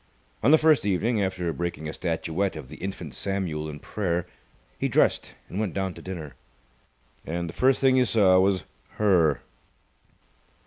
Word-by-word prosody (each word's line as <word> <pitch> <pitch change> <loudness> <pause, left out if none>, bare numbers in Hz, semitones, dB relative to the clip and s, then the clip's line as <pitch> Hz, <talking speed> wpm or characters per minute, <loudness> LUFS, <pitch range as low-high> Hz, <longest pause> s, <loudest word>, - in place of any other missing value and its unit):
On 120 - +4
the 155 - +8
first 155 -2 +4
evening, 105 +3 +1
after 90 -3 -1
breaking 80 -1 -4
a 75 - -5
statuette 85 +2 -2
of 75 -5 -8
the - - -10
Infant 90 -7 -6
Samuel 85 -5 -2
in 75 - -7
Prayer, 90 -1 -2 0.5
he - - +1
dressed - - +1
and 95 - -5
went 105 -5 -2
down 95 -2 -1
to - - -11
dinner. 80 -7 -7 0.9
And 85 +1 -3
the 85 - -7
first 130 0 +3
thing 130 -1 +4
he 130 - +4
saw 95 -5 +5
was 95 0 +2 0.3
Her. 90 -8 +3
95 Hz, 165 wpm, -26 LUFS, 80-105 Hz, 0.9 s, the